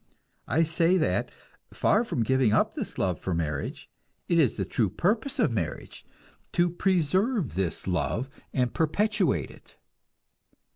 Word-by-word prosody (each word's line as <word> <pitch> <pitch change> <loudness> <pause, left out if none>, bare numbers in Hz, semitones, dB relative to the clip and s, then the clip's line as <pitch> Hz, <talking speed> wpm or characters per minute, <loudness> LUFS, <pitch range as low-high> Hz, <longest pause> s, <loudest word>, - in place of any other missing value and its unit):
I 165 - +3
say 165 +3 +2
that, 90 - 0 0.4
far 215 +3 +2
from 125 - -1
giving 130 -2 +2
up - - +2
this - - -6
love 90 -4 0
for 95 - -2
marriage, 75 -4 -3 0.4
it 170 - +3
is 140 -8 +3
the 95 - -1
true 105 +2 0
purpose 225 - 0
of 230 - +2
marriage 90 -9 -4 0.5
to 175 0 +2
preserve 185 - +1
this 90 -1 -2
love 90 - -1 0.2
and 125 -2 0
perpetuate 180 - +1
it. - - -19
145 Hz, 140 wpm, -27 LUFS, -, 0.5 s, I